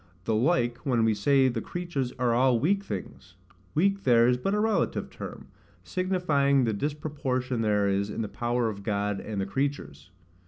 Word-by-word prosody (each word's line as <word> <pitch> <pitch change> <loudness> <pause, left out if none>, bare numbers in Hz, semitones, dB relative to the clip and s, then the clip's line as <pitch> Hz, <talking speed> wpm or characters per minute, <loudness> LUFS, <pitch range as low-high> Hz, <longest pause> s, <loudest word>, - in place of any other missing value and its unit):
The 110 - -1
like 120 0 +2
when 120 -6 +1
we 110 - +3
say 135 +6 +3
the 120 -3 -1
creatures 170 -8 -3
are 125 -2 +1
all 125 0 +3
weak 195 - +1
things; 95 - -7 0.4
weak 195 +4 +2
there 120 -4 +5
is 125 - +4
but 195 +11 -1
a - - +1
relative 220 +1 0
term, - - -9 0.3
signifying 155 -8 +1
the 115 -2 0
disproportion 135 -2 -2
there 105 -2 +2
is 100 +1 0
in 115 - -3
the - - -3
power 120 +2 -1
of 100 -2 -5
God 100 -1 -1
and 105 -2 -5
the 95 - 0
creatures. 95 - -3
125 Hz, 180 wpm, -27 LUFS, 110-145 Hz, 0.4 s, there